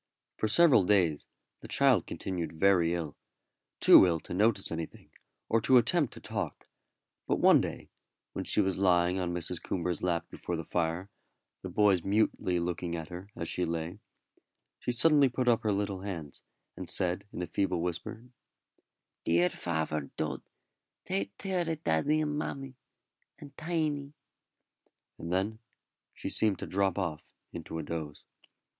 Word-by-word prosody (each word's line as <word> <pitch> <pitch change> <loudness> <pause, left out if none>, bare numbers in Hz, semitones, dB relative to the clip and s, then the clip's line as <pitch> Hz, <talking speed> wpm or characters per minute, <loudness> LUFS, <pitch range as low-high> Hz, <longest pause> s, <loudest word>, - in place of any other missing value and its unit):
For 110 - -1
several 140 - +6
days 90 -6 +2 0.3
the - - -10
child - - +3
continued 85 -4 -5
very 90 -4 +4
ill 80 -4 -4 0.6
too - - +9
ill 85 -2 +1
to - - -8
notice 105 +1 +2
anything, 80 -1 -6 0.4
or 115 - +2
to 130 +3 +5
attempt 145 +4 +2
to - - -9
talk; - - -5 0.6
but - - +1
one - - +6
day, - - -6 0.4
when - - -3
she - - +2
was 95 -2 -1
lying 90 -1 +3
on 90 -1 -1
Mrs. 85 0 -3
Coomber's 90 -1 -2
lap 85 -2 0
before 90 - -4
the 80 -1 -5
fire, 85 +4 -2 0.5
the 95 - -6
boys 100 -1 +3
mutely 95 -3 +1
looking 85 0 -3
at 80 -2 -6
her 90 +3 -8
as 85 - -4
she 90 - -1
lay, 85 +3 -3 0.8
she - - -2
suddenly 140 +2 +5
put 125 0 -2
up 120 -2 +4
her 110 - 0
little 100 -1 -2
hands, 85 -8 -6 0.3
and - - -7
said 90 +2 0
in 90 - -4
a - - -1
feeble 90 +1 -1
whisper, 90 +6 -4 1.0
"Dear 85 +2 +3
faver 80 -3 -2
Dod, 75 -4 -2 0.6
tate 100 +1 -2
tare 185 -4 -1
o' 165 - 0
daddy 150 - +1
and 150 -1 -1
mammy, 135 -3 -5 0.6
and 140 -2 -13
Tiny;" 155 -3 -2 1.1
and 85 - -6
then 100 +4 -1 0.5
she - - -7
seemed 105 -4 +2
to - - -6
drop 95 -1 0
off 85 -6 -4 0.2
into 80 -1 -6
a 80 - -4
doze. 75 -2 -6
95 Hz, 155 wpm, -30 LUFS, 85-110 Hz, 1.1 s, too